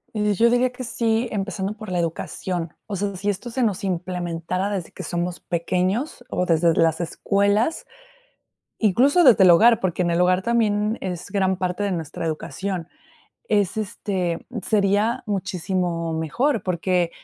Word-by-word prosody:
Eh, 210 -1 +1
yo 230 +5 +4
diría 245 +1 +2
que 255 +1 -7
sí, 230 0 0
empezando 200 -1 -2
por 215 -2 -9
la 180 - -1
educación. 170 0 -3
O 205 - -5
sea, 200 +1 -2
si 195 +3 -2
esto 205 +5 -3
se 250 +2 -1
nos 205 -4 0
implementara 180 0 -2
desde 195 -5 -4
que - - -9
somos 175 0 -3
pequeños 185 - -1
o 180 - 0
desde 165 -1 +3
las 165 0 +2
escuelas, 200 - 0 0.9
incluso 255 - +4
desde 240 - +7
el 180 - +8
hogar, 230 +7 +6
porque 185 -1 -1
en 175 - +1
el 170 - +1
hogar 180 +1 +3
también 215 -1 +1
es 180 -1 -5
gran 190 -2 +1
parte 185 +2 -2
de 200 - 0
nuestra 165 -2 -4
educación, 170 +2 -4 0.6
es, 200 -2 +1
este, 190 -5 -3 0.2
sería 210 +5 +1
muchísimo 185 -4 -2
mejor, 210 - 0
porque 180 -1 0
190 Hz, 155 wpm, -23 LUFS, 175-215 Hz, 0.9 s, el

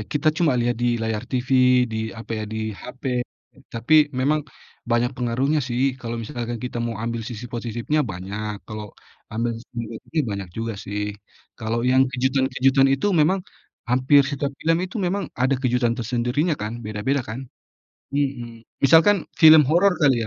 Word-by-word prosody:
kita 155 +1 +1
cuma 155 -4 +2
lihat 120 -1 0
di 120 0 +2
layar 110 -1 -2
TV, 125 0 +3
di, 110 - -3 0.2
apa 115 0 -7
ya, - - -3
di 110 0 -3
HP, 125 +2 -4 0.5
tapi 150 +7 +4
memang, 145 +4 +2 0.5
banyak 120 +2 +2
pengaruhnya 130 +5 0
sih. 130 +2 0
Kalau 120 -1 -4
misalkan 120 0 -4
kita 120 0 -4
mau 115 -2 -3
ambil 115 +1 -3
sisi 120 +1 -7
positifnya 120 +5 -2
banyak, 105 0 -5
kalau 105 -2 -7 0.4
ambil 115 +2 -1
sisi 115 +2 -13
negatifnya 115 +7 -3
banyak 100 -2 -4
juga 115 +4 -4
sih. 105 +1 -4 0.4
Kalau 110 +1 -2
yang 130 +1 +5
kejutan-kejutan 130 +1 +2
itu 135 +7 +1
memang, 170 +4 +3 0.5
hampir 130 +3 +5
setiap 140 0 -2
film 165 +1 +2
itu 195 - -8
memang, 195 0 -1
ada 130 +2 +2
kejutan 125 -2 +1
tersendirinya 120 +8 0
kan. 110 +3 -5
Beda-beda 110 +6 -1
kan. 120 +4 -7 0.7
Mhm. 120 -5 -2 0.2
Misalkan 165 +6 +5 0.2
film 155 -1 +9
horor 175 +7 +4
kali 135 -7 +3
125 Hz, 155 wpm, -23 LUFS, 115-140 Hz, 0.7 s, film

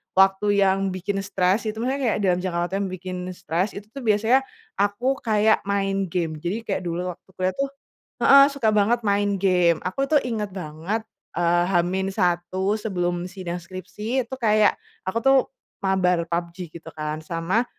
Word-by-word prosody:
waktu 195 +1 +4 0.2
yang 190 0 +3 0.2
bikin 195 +2 -2
stress, 195 +2 0
itu 215 - -2
maksudnya 270 +2 -1
kayak 230 - +2
dalam 180 -2 +3
jangka 175 -2 -2
waktu 190 - -4
yang 195 -2 -2
bikin 185 0 -6 0.2
stress, 180 +3 -2
itu 205 +1 -8
tuh 275 -2 -8
biasanya 220 +5 +4 0.4
aku 225 +7 +1
kayak 220 -3 +3
main 195 -1 0
game. 160 -3 -2
Jadi 195 +8 -3
kayak 195 -4 -2
dulu 180 +2 -2
waktu 175 - -16
kuliah 185 0 0
tuh 275 - +2 0.5
heeh, 275 0 +8
suka 275 -6 -1
banget 220 +4 +3
main 200 -1 +1
game. 180 -3 +3
Aku 230 +10 -1
tuh 295 - +6
inget 210 -4 -3
banget, 180 +5 -3 0.3
eee, 175 0 +3
H-1 185 +1 0
sebelum 175 -4 -2
sidang 180 -2 -5
skripsi 185 +8 -4
itu 265 +3 -7
kayak, 215 -2 +4 0.3
aku 190 - -1
tuh 270 0 +6 0.5
mabar 180 -3 +2
PUBG 170 0 -3
gitu - - -19
kan. 155 0 -3
Sama 170 +9 -1
190 Hz, 165 wpm, -24 LUFS, 175-215 Hz, 0.5 s, heeh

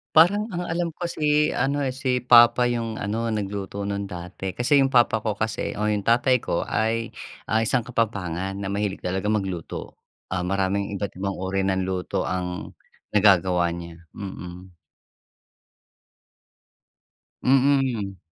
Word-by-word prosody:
Parang 200 +7 +5
ang 175 - -2
alam 170 +1 -1
ko - - -7
si 150 -2 +2
ano, 140 +1 0
eh, 130 - 0
si 125 -2 -1
papa 120 0 +7
'yung 115 -2 -2
ano, 110 +3 -2
nagluto 100 -2 -3
'nun 100 0 -3
dati. 90 +1 -6
Kasi 140 +4 +3
'yung 135 - +4
papa 120 -3 +4
ko 110 -1 -2
kasi 110 +2 -2
o 105 - -1
'yung 105 -1 -1
tatay 125 +2 +4
ko 85 - -1
ay, 115 +1 -1 0.4
ah, 110 - +4
isang 120 +2 +2
Kapampangan 95 -6 -2
na 100 - -4
mahilig 100 -1 -2
talaga 95 +3 -2
magluto. 95 -6 -3 0.4
Ah, 90 -1 -1
maraming 100 +1 0
iba't 100 +1 -3
ibang 100 0 -2
uri 95 +1 -1
ng 95 -1 +1
luto 95 -1 -2
ang 90 -1 -3 0.4
nagagawa 90 -4 +4
niya, 85 -1 -7 0.2
mm. 90 -2 -8 2.7
Mm. 130 -7 +2
105 Hz, 140 wpm, -24 LUFS, 95-125 Hz, 2.7 s, papa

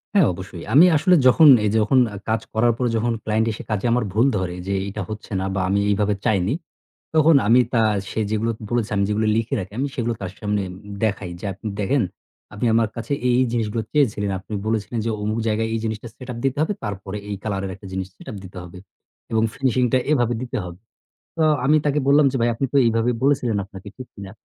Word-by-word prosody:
হ্যাঁ, 190 -7 +6
অবশ্যই। 90 -1 -8
আমি 155 +6 +8
আসলে 180 +4 +4
যখন, 155 +5 +7 0.2
এই - - +2
যে - - +3
যখন 130 +5 +3
আ - - -6
কাজ 110 -1 +1
করার 115 +2 +3
পরে 125 -1 0
যখন 115 +1 0
ক্লায়েন্ট 110 +1 +1
এসে 105 - -7
কাজে 105 -1 -1
আমার 120 0 +2
ভুল 115 +4 +3
ধরে 90 -1 -3
যে 100 - -1
এইটা 105 +1 -5
হচ্ছে 110 0 -8
না 95 - -2
বা 95 - 0
আমি 100 +1 +2
এইভাবে 105 0 +1
চাইনি। 105 -1 +2 0.6
তখন 155 0 +6
আমি 120 +3 +6
তা 115 - +4 0.3
সে - - -3
যেগুলো 110 +2 0 0.2
বলেছে 120 -3 -1
আমি 100 - +2
যেগুলো 105 +1 0
লিখে 115 +4 -1
রাখি 95 +1 -7
আমি 140 - 0
সেগুলো 120 -1 -1
তার 95 -2 -4
সামনে 105 -1 -1
উম - - -10 0.3
দেখাই 100 -4 -1
যে, 105 - -8
"আপনি 110 +4 -8
দেখেন 115 +6 +1 0.5
আপনি 105 +3 -3
আমার 115 -1 +3
কাছে 115 +3 -3
এই, 125 - +3
এই - - +3
জিনিসগুলো 115 -1 -1
চেয়েছিলেন। 105 -8 +1
আপনি 105 - -10
বলেছিলেন 110 +1 -1
যে - - 0
অমুক 110 +2 -1
জায়গায় 110 +1 0
এই 115 - -1
জিনিসটা 110 +1 -4
সেট-আপ 125 -2 -8
দিতে 135 +1 0
হবে 160 +6 +1
তারপরে 100 -1 -5
এই 100 - -2
কালার 100 -3 -2
এর 95 - -4
একটা 100 +1 -12
জিনিস 95 0 -3
সেট-আপ 105 - -8
দিতে 95 0 -11
হবে 90 +1 -11 0.5
এবং 110 -1 +2
ফিনিশিংটা 130 -1 +1
এভাবে 120 -5 +2
দিতে 125 -1 -4
হব।" 90 -1 -7 0.6
তো - - 0 0.2
আমি 150 +3 +5
তাকে 145 0 +2
বললাম 145 +1 +5
যে, - - -5
"ভাই 120 - +3
আপনি 135 - -1
তো - - +4
এইভাবে 115 +1 +2
বলেছিলেন 130 -6 +2
আপনাকে, 100 0 -12
ঠিক 130 -1 -8
কিনা?" 100 -2 -9
110 Hz, 220 wpm, -22 LUFS, 100-125 Hz, 0.6 s, আমি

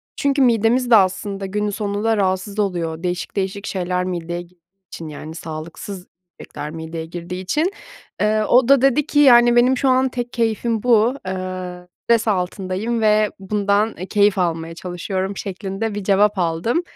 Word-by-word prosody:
çünkü 280 0 +1
midemiz 240 0 +3
de 235 - +7
aslında 195 0 +1
günün 210 +2 -2
sonunda 210 +2 -1
rahatsız 190 +1 -1
oluyor. 170 -5 -2
Değişik 180 0 -3
değişik 195 +1 -3
şeyler 180 -2 -2
mideye 175 -1 -4
gi 175 +1 -17 0.4
için, 165 - -7
yani, 155 +1 -8
sağlıksız 165 +4 -7 0.3
yemekler 150 - -7
mideye 160 0 -6
girdiği 175 +2 -6
için. 305 - 0 0.5
Eee, 215 +1 +2
o 245 +3 +4
da 275 -1 +5
dedi 275 +2 +3
ki: 290 - +1
"Yani, 240 -4 +7
benim 250 +2 +4
şu 270 - +1
an 260 +1 +3
tek 245 -1 -5
keyfim 225 -1 -1
bu, 240 0 +4
eee, 185 -1 -5 0.2
stres 230 -1 +2
altındayım 195 +3 -1
ve 215 -1 +3
bundan, 205 +2 0
eee, 185 - -5
keyif 205 -1 +3
almaya 165 -2 -1
çalışıyorum." 185 +3 -4
şeklinde 200 +2 -4
bir 205 - -4
cevap 205 +1 +3
aldım. 175 - 0
200 Hz, 160 wpm, -20 LUFS, 180-225 Hz, 0.5 s, de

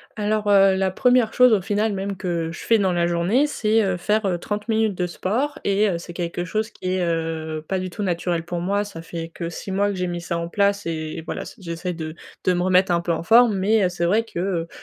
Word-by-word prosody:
Alors, 210 0 -1
heu, 195 -1 +6
la 190 0 +1
première 245 +3 +3
chose 250 -2 +6
au 200 - +3
final 210 +2 0
même 195 0 -3
que 170 -4 -2
je 170 - -8
fais 225 -2 +2
dans 190 -2 +2
la 170 0 +2
journée, 175 +11 +2
c'est, 220 -6 +1
heu, 190 -2 0
faire, 210 +4 0
heu, 175 -2 0
30 210 +3 -4
minutes 220 -3 +1
de 180 - 0
sport 225 - -2
et 200 +1 +2
heu, 170 - -1
c'est 175 0 -9
quelque 175 0 -3
chose 215 +5 -2
qui 185 0 -4
est, 185 - 0
heu, 160 -2 -2
pas 190 - -1
du 185 0 -3
tout 210 - -6
naturel 175 -2 -1
pour 175 0 -4
moi, 200 +4 0
ça 165 -5 -9
fait 165 0 -6
que 170 -1 -4
6 190 +3 -7
mois 200 +2 +1
que 200 - -3
j'ai 180 -1 -2
mis 175 -1 -4
ça 170 0 -3
en 170 - -3
place 200 +1 +1
et 155 -1 -4
voilà, - - -5
ça - - -11
j'essaie 175 0 -4
de 160 -1 -6 0.3
de 185 - +4
me 175 - 0
remettre 185 0 +3
un 170 0 +2
peu 175 - -2
en 165 - -1
forme. 225 0 +5
Mais, 210 +2 +3
heu, - - +2
c'est 175 -1 -2
vrai 210 +6 +3
que, 170 - -6
heu, 175 -3 -1
185 Hz, 265 wpm, -22 LUFS, 170-210 Hz, 0.3 s, heu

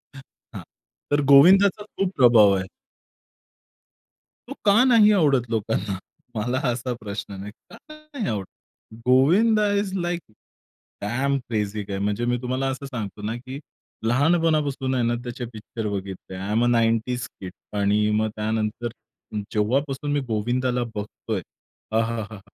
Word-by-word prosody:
हं, 135 - -10 0.3
हां - - -6 0.5
तर 145 - +4
गोविंदाचा 195 +8 +7
खूप 195 -3 -2
प्रभाव 115 -6 +7
आहे. 95 - -3 1.8
तो - - -6
का 210 +4 +6
नाही 230 -5 +6
आवडत 135 -7 +2
लोकांना? 105 -3 -1 0.4
मला 125 +4 -1
असा 125 +1 -2
प्रश्न 100 -1 -6
नाही. 100 +2 -7 0.2
का - - -12 0.2
नाही 305 -7 -6
आवडत? 100 -3 -2 0.6
गोविंद 175 - +4 0.2
इस 190 -2 -6
लाइक 175 -1 -2 0.8
डॅम 135 +7 0
क्रेझी 105 -4 -3
गाय 95 -1 -3
म्हणजे 105 +4 -1
मी 120 0 +1
तुम्हाला 130 +2 -1
असं 135 +1 -5
सांगतो 110 -7 -6
ना, 110 +2 -3
की 130 +3 -8 0.5
लहानपणापासून 145 -1 +2
आहे 125 - +1
ना 120 - +1
त्याचे 120 0 -5
पिक्चर 110 0 -6
बघितले, 95 -2 -6
आय 95 +3 -4
एम 115 +2 +2
अ, - - +3
90's 120 +1 +1
किड 95 -1 -7 0.3
आणि 105 +1 +2
मग 110 0 0
त्यानंतर 110 +2 -2 0.7
जेव्हापासून 135 +7 0
मी 145 - +2
गोविंदाला 120 +3 0
बघतोय, 105 0 -4 0.6
आहाहा! 110 -2 -3
120 Hz, 135 wpm, -24 LUFS, 105-140 Hz, 1.8 s, गोविंदाचा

